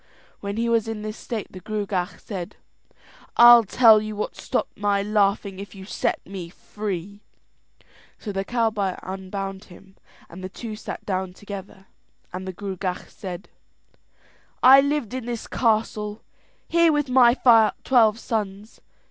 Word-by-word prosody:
When 200 +1 -5
he 230 +1 0
was 230 -2 +1
in 220 -1 -5
this 215 0 -5
state 230 -4 -6
the 185 - -9
Gruagach 200 -3 -3
said: 185 -5 -7 0.8
"I'll 240 0 +9
tell 220 +1 +6
you 215 0 -5
what 210 - -4
stopped - - -3
my 200 -1 0
laughing 200 -2 0
if 200 +1 -9
you 190 -1 -10
set - - -2
me 185 -3 -7
free." 200 +1 -6 1.0
So 210 - -6
the 195 0 -2
cowboy 215 -4 0
unbound 195 +1 -6
him, 190 +1 -17 0.3
the 185 +2 -8
two 220 +2 -7
sat 215 - -8
down 185 -2 -2
together, 195 -1 -10 0.5
and 185 +1 -6
the 185 - -4
Gruagach 185 -1 -5
said: 185 -1 -8 1.2
"I 265 +2 +9
lived 280 -5 -1
in 255 -2 -4
this 235 -2 -4
castle 215 -2 -1 0.4
here 335 -1 +4
with 295 -2 0
my 250 -2 +5 0.5
twelve 225 -4 +4
sons. 210 -3 -4
205 Hz, 140 wpm, -24 LUFS, 190-225 Hz, 1.2 s, I'll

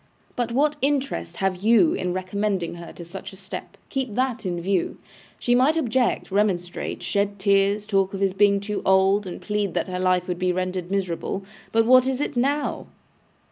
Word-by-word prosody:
But 240 -1 -1
what 295 +4 +2
interest 275 -9 -1
have 190 -1 0
you 235 - +4
in 180 - -2
recommending 185 0 -2
her 170 0 -9
to 170 - -10
such 190 +3 -8
a - - -10
step? 190 0 -8
Keep 260 -6 -3
that 250 -4 -1
in 175 -1 -2
view. 185 0 -1 0.4
She 245 - +1
might 265 +6 +4
object, 245 -7 0
remonstrate, 190 -3 -1
shed 200 0 0
tears, 200 +1 +2
talk 195 -2 +1
of - - -4
his 195 -1 +1
being 200 0 +4
too 205 0 -3
old, 190 +1 +3
and 180 - -6
plead 210 -4 -2
that - - 0
her 180 0 -3
life 185 -1 +2
would 180 -1 -3
be 185 -1 +1
rendered 185 0 -2
miserable. 190 0 -2 0.3
But 225 0 +3
what 255 +1 +6
is 265 -1 -1
it 290 -1 -2
now? 280 +4 0
200 Hz, 185 wpm, -24 LUFS, 185-240 Hz, 0.4 s, what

